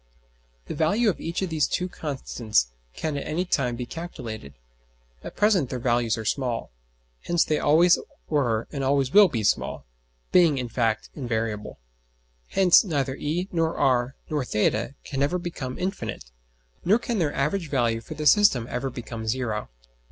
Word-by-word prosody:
The - - -5
value 205 +9 +2
of - - -10
each 170 +3 -2
of 185 - -3
these 155 -2 +2
two 180 - -1
constants 120 - -1 0.2
can 155 -2 -3
at 140 - -5
any 175 +4 -1
time 125 -8 0
be 125 +1 -4
calculated. 115 - -7 0.7
At - - -8
present 195 - +3
their 130 - -3
values 120 -1 +1
are 110 - -5
small. 120 - -2 0.5
Hence 175 -1 +2
they 155 - +1
always 170 +4 +5 0.3
were 120 -7 0
and 140 -3 -3
always 135 -1 +1
will 205 -1 +9
be 115 -10 -3
small; - - 0 0.5
being, 170 -6 +5
in 125 -2 -3
fact, 115 -2 -1
invariable. 115 -5 -3 0.7
Hence 185 -3 +6
neither 140 - -1
e 165 +6 -2
nor 165 -1 0
r 130 -2 +2
nor 150 -3 -1
[theta] 120 +4 0
can 135 -1 -4
ever 145 +6 +2
become 165 -8 -5
infinite, 185 - -4 0.5
nor 205 +5 +4
can 235 -2 -2
their 150 -4 0
average 155 +5 -1
value 120 -5 +1
for 155 - -9
the 150 0 -4
system 150 - +5
ever 130 +2 -2
become 115 -2 -7
zero. 110 -3 -2
140 Hz, 165 wpm, -25 LUFS, 120-170 Hz, 0.7 s, will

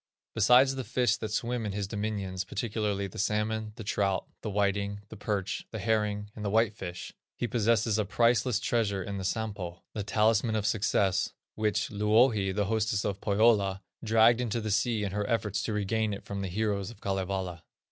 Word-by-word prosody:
Besides 125 +5 +5
the 135 -1 -4
fish 125 +2 +1
that 110 - -4
swim 120 +2 -1
in 105 -2 -3
his 100 -1 -2
dominions, 100 -3 -3
particularly 105 0 -2
the 95 - -8
salmon, 105 +1 -1
the 115 - -7
trout, 100 -1 0 0.2
the 110 - -4
whiting, 100 0 0
the - - -9
perch, 100 -3 -3
the 110 - -6
herring, 105 -1 0
and 105 - -7
the 100 - -1
white 110 +1 +3
fish, 90 -4 -7 0.2
he - - -2
possesses 115 -1 +2
a - - +3
priceless 120 +2 +2
treasure 110 -6 0
in 100 0 -4
the - - -4
Sampo, 95 -4 -3
the 105 - -3
talisman 110 +2 +2
of 105 -2 -1
success, 100 -3 +1 0.2
which 105 -3 0
Louhi, 105 -1 +3
the 100 +1 0
hostess 110 -1 0
of 100 -1 -2
Pohyola, 100 -2 +3 0.2
dragged 115 +2 +5
into 120 -1 -1
the 110 -1 -3
sea 105 +2 +1
in 100 - -2
her 105 +2 -2
efforts 105 -4 0
to 110 - -2
regain 105 +1 0
it - - -11
from 100 -1 -4
the 95 - -2
heroes 100 +1 -1
of 115 - -12
Kalevala. 95 -3 -2
105 Hz, 190 wpm, -29 LUFS, 100-110 Hz, 0.2 s, Besides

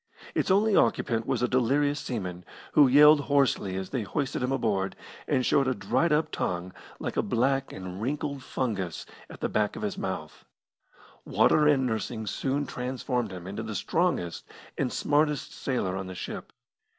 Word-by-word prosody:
Its - - 0
only 205 +2 +4
occupant 115 -1 +2
was - - 0
a - - +3
delirious 140 +4 +2
seaman, 90 -7 -4 0.3
who 145 -2 +6
yelled 150 +3 +8
hoarsely 140 -9 +1
as 95 0 -5
they 130 - -1
hoisted 130 +8 -2
him 125 +1 0
aboard, 105 -7 0 0.3
and 130 - +1
showed 135 -1 +3
a 130 - +1
dried 140 +10 +1
up 150 +1 +2
tongue 90 +1 -3 0.2
like - - -4
a - - +4
black 135 +3 0
and 95 +1 -7
wrinkled 140 +2 -2
fungus 100 - -3 0.2
at - - -11
the - - +1
back 105 -1 0
of - - -6
his 200 -2 -3
mouth. 90 -5 -5 0.8
Water 150 -1 +4
and 135 -3 +4
nursing 110 -1 -2
soon 135 +7 -1
transformed 125 -3 -3
him 90 -2 -8
into 100 +3 -5
the 110 -1 -5
strongest 160 - -1 0.3
and - - -1
smartest 150 -1 +1
sailor 120 -9 -2
on 95 -1 -4
the 95 - -7
ship. 95 - -6
125 Hz, 170 wpm, -28 LUFS, 95-145 Hz, 0.8 s, yelled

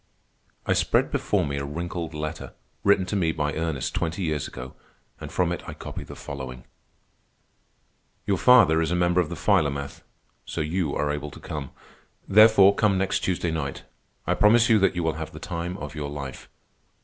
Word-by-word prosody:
I - - +2
spread - - +2
before - - 0
me 70 0 -3
a 70 - -3
wrinkled 85 +2 -5
letter, 75 0 -5 0.3
written 100 -2 +4
to 90 - -3
me 85 -5 +2
by 75 -1 -2
Ernest 80 -4 -2
twenty 85 +3 -2
years 75 -4 -1
ago, 65 0 -9 0.5
and - - -8
from 90 -2 +1
it 85 - -3
I - - -7
copy - - -7
the - - -10
following: 65 -2 -8 1.6
"Your 100 - 0
father 105 -11 +6
is 80 - 0
a 90 - 0
member 90 0 +3
of 80 - -3
the - - -5
Philomath, 70 -1 0 0.4
so - - -6
you 80 0 -1
are 75 0 0
able 75 0 -4
to - - -12
come. 75 -3 -6 0.6
Therefore 105 -1 +7
come 100 -2 +2
next 95 0 0
Tuesday 85 -2 -1
night. 70 -4 -4 0.4
I - - +1
promise 115 +3 +4
you 110 -2 +5
that 95 -1 +2
you 85 - -1
will 80 -1 +1
have 80 - -6
the - - -9
time 85 +2 -4
of 75 -6 -7
your 75 -2 -4
life. 70 -3 -7
80 Hz, 185 wpm, -25 LUFS, 75-95 Hz, 1.6 s, Therefore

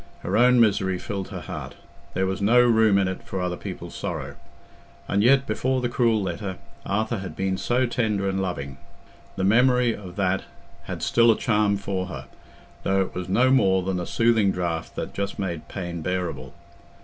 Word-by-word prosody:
Her 95 - -2
own 125 +2 +5
misery 95 -4 +3
filled 95 +1 -5
her 95 -3 -7
heart—there 95 +4 -6
was 95 +1 -2
no 115 +5 +5
room 110 -4 +5
in 95 -1 +2
it 95 - -4
for 95 - -5
other 90 -1 -1
people's - - -7
sorrow. - - -5 0.7
And 100 - +1
yet, 130 +4 +5
before 130 -1 0
the 125 -1 -1
cruel 115 -3 +2
letter, 95 0 -4 0.3
Arthur 110 +2 -1
had 95 -1 -7
been 95 0 -1
so 120 +6 +1
tender 110 -5 0
and 95 0 -1
loving. 70 -8 -4 0.6
The 95 - -2
memory 125 +3 +4
of 90 -3 -10
that 95 -1 0 0.4
had - - -5
still 115 0 +4
a 110 - +5
charm 105 -3 +2
for 95 -2 -3
her, 70 -6 -7 0.6
though 95 0 +1
it 95 - -3
was 90 0 -5
no 125 +7 +4
more 95 -8 +3
than 95 0 -1
a 90 - -4
soothing 115 -3 +3
draught 85 -3 -3
that - - -5
just 100 0 -3
made 90 -5 -4
pain 85 -3 -5
bearable. 85 -7 -3
100 Hz, 185 wpm, -24 LUFS, 95-115 Hz, 0.7 s, own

